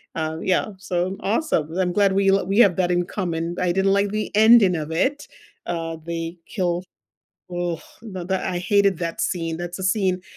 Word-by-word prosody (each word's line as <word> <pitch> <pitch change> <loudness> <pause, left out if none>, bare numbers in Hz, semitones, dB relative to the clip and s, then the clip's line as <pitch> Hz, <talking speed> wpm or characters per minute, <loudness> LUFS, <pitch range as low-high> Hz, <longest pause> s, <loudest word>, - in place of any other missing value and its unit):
Uh, 160 0 -2
yeah, 185 -1 +1
so 180 -2 -1
m 195 - -5
awesome, 205 - 0
I'm 180 -1 +1
glad 200 -1 +3
we 195 0 +3
l 195 0 +3
we 200 +4 +1
have 195 -7 +6
that 180 -2 +1
in 175 0 +1
common. 170 -3 -3
I 180 -1 +1
didn't 195 +2 +2
like 200 0 +2
the 215 0 -2
ending 215 -4 +6
of 155 0 -4
it, 265 - 0 0.4
uh, 165 -1 -3
they 170 0 -4
kill 180 -4 -2 0.7
ugh, 175 -2 -3 0.2
no 190 -6 -7
that 190 0 -1
I 180 - -1
hated 200 -1 +2
that 165 -1 -3
scene, 165 -3 -1
that's 175 +1 -6
a - - -4
scene 190 -2 +1
180 Hz, 195 wpm, -23 LUFS, 170-195 Hz, 0.7 s, have